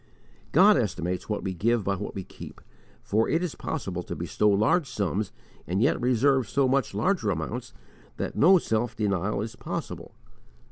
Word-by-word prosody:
God 200 +7 +6
estimates 90 -4 -2
what 105 - -2
we 95 - -2
give 110 +5 +1
by 100 0 0
what - - -6
we 95 - -4
keep, - - -11 0.4
for 110 +2 +1
it 165 +2 +1
is 175 - -2
possible 95 - -4
to - - -6
bestow 105 - +1
large 110 - +2
sums 100 -1 -2 0.4
and 90 +4 0
yet 120 - +2
reserve 125 -1 +2
so 140 -2 +2
much 130 -5 0
larger 115 - +1
amounts 80 -5 -3 0.5
that - - -4
no 185 +5 +6
self 115 -6 -1
denial 100 -1 -1
is 115 +2 -7
possible. - - -6
110 Hz, 170 wpm, -26 LUFS, 100-130 Hz, 0.5 s, God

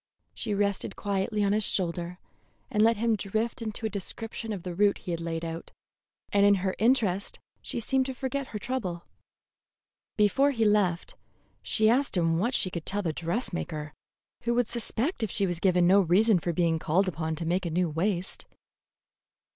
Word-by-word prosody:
She 210 -3 -3
rested 200 -1 -1
quietly 205 +1 -1
on 200 0 +2
his 215 +1 +2
shoulder 175 -2 -1 0.5
and 210 - +2
let 225 0 +4
him 230 +1 +2
drift 220 +4 -2
into 220 0 -4
a - - +1
description 225 +3 -5
of 195 -5 -4
the 180 - -4
route 200 +3 +3
he 180 - -6
had 170 -1 -3
laid 165 0 -3
out, 165 0 -6 0.6
and 200 0 +4
in 205 0 +6
her 190 - +1
interest 215 -5 +1 0.2
she - - -3
seemed 260 +3 +1
to 265 - -4
forget 270 +1 -3
her 215 - -5
trouble. 200 -7 -4 1.1
Before 240 +7 +4
he 230 -5 +1
left, 200 -5 +2 0.5
she 220 -1 +2
asked 250 -1 +2
him 165 -1 +2
what 240 +7 +1
she 185 - +2
could 170 -2 -4
tell 205 +1 -1
the 165 -3 -1
dressmaker, 165 -4 -3 0.5
who 235 0 +1
would 245 -2 +2
suspect 240 - -2
if 220 - 0
she 200 - +1
was 175 -3 -2
given 180 -1 +3
no 195 +3 +6
reason 195 +3 +4
for 175 - -2
being 165 -1 +1
called 180 +6 +2
upon 160 -2 -2
to 165 +1 -5
make 180 +2 0
a - - -2
new 175 +2 +1
waist. 175 +3 -2
200 Hz, 185 wpm, -28 LUFS, 175-225 Hz, 1.1 s, in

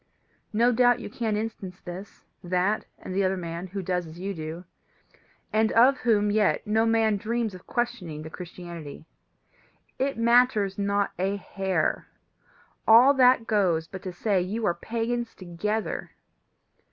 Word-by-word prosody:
No 235 +3 +3
doubt 245 0 +4
you - - -7
can 220 -3 -1
instance 205 -4 -5
this, 185 +3 -10 0.2
that, 180 +4 0
and 185 - -8
the 195 +1 +1
other 190 0 +1
man 170 +1 -5
who 195 +1 -5
does 180 -1 -1
as 160 +1 -11
you 195 +2 -3
do, 160 +1 -7 0.9
and 220 0 +3
of 255 +4 +6
whom 210 -3 +2
yet 210 +1 +2
no 220 +2 +2
man 225 -2 +3
dreams 225 +1 -2
of 185 - -12
questioning 225 -11 -3
the 160 - -9
Christianity: 170 -4 -9 0.9
it 275 -1 0
matters 230 -4 +3
not 200 0 +1
a 195 +2 0
hair; 190 -4 -1 0.8
all 240 +5 +8
that 255 -3 +5
goes 180 -7 +1
but 190 +1 -8
to 185 - -5
say 185 +1 0
that 180 - -4
you 220 +2 -2
are 175 - +2
pagans 230 +5 -3
together. 205 +5 -3
205 Hz, 150 wpm, -26 LUFS, 180-225 Hz, 0.9 s, all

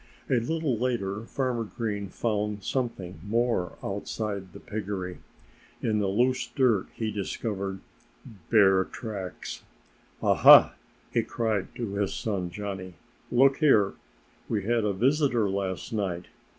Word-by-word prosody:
A 125 - +4
little 140 -1 -1
later 115 -4 -1
Farmer 125 -4 -1
Green 105 -3 -4
found 105 -1 -2
something 100 - -3
more 115 -3 0
outside 100 -1 -4
the - - -11
piggery. 95 -4 -5 0.6
In 110 -2 +1
the 100 - +1
loose 125 +6 +1
dirt 125 -9 +2
he 110 -1 -2
discovered 100 -1 -3 0.7
bear 95 -4 +5
tracks! 100 -3 -6 0.6
"Aha!" - - +8 0.4
he - - +3
cried 110 -4 -1
to 115 -5 -4
his 100 -1 -1
son 95 -5 -2
Johnnie. 95 -1 -6 0.4
"Look 135 +2 +5
here! 110 -11 +4 0.6
We 105 -4 0
had 115 +1 +1
a 105 - +1
visitor 125 0 +2
last 95 +1 -3
night. 90 -5 -2
105 Hz, 125 wpm, -27 LUFS, 95-120 Hz, 0.7 s, Aha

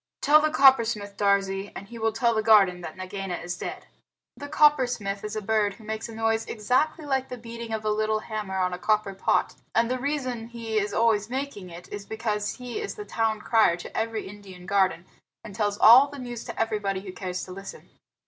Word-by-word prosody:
Tell 305 +1 +5
the 310 - +2
Coppersmith, 230 -9 +4
Darzee, 200 -1 +1
and 200 - -9
he 235 - -9
will 225 0 +1
tell 235 +2 +1
the 220 - +1
garden 200 -5 +5
that 170 0 -8
Nagaina 185 0 -5
is 175 +1 -5
dead." - - -6 0.5
The 285 - -8
Coppersmith 245 -10 +2
is 210 +1 -5
a 215 - -3
bird 210 -1 +1
who 225 - -16
makes 220 +1 -5
a 225 - -9
noise 225 0 +1
exactly 260 +9 0
like 265 -2 -1
the 250 - -6
beating 230 0 -8
of 220 -1 -3
a 215 - +2
little 215 0 0
hammer 210 -4 -4
on 180 -1 0
a 180 - -5
copper 215 -1 +1
pot; 190 - +1 0.2
and 230 +1 +2
the 255 - -1
reason 255 -5 -3
he 230 -2 -2
is 205 0 -2
always 220 -1 +2
making 255 -8 -5
it 170 +1 -11
is 205 -1 -7
because 210 -2 -2
he 250 - -6
is 410 - -5
the 420 - -7
town 220 - -1
crier 220 -7 +3
to 175 - -10
every 225 -1 -2
Indian 190 -3 -12
garden, 185 -3 +1 0.4
and 215 - -10
tells 205 -1 -1
all 245 +7 +8
the 285 0 -10
news 245 -3 -6
to - - -7
everybody 210 -4 -1
who 195 -1 -8
cares 185 -1 -4
to 185 - -9
listen. 195 +1 -9
215 Hz, 215 wpm, -26 LUFS, 200-235 Hz, 0.5 s, all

